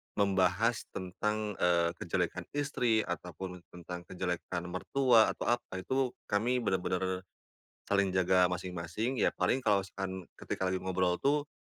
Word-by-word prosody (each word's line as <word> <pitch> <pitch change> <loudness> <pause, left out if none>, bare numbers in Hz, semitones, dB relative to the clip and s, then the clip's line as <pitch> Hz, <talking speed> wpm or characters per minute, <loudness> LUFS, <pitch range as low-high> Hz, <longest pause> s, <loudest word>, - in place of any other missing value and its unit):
membahas 100 +3 +2
tentang, 105 +3 -2
eee, 85 -1 +3
kejelekan - - -1
istri 125 -6 +2
ataupun 90 +1 -5
tentang 90 0 -7
kejelekan 90 -1 -3
mertua 120 +4 +4
atau - - -6
apa, 105 -6 -1
itu 130 +1 0 0.2
kami 120 +5 +2
benar-benar 95 -1 -1 0.7
saling 100 -2 +3
jaga 95 0 +4
masing-masing, 90 +7 -3
ya - - +3
paling 130 - +2
kalau 100 -2 +4
misalkan 95 0 -5 0.2
ketika 95 - -2
lagi 95 0 0
ngobrol 90 -1 +1
tuh, 145 +1 +1
95 Hz, 130 wpm, -32 LUFS, 90-110 Hz, 0.7 s, mertua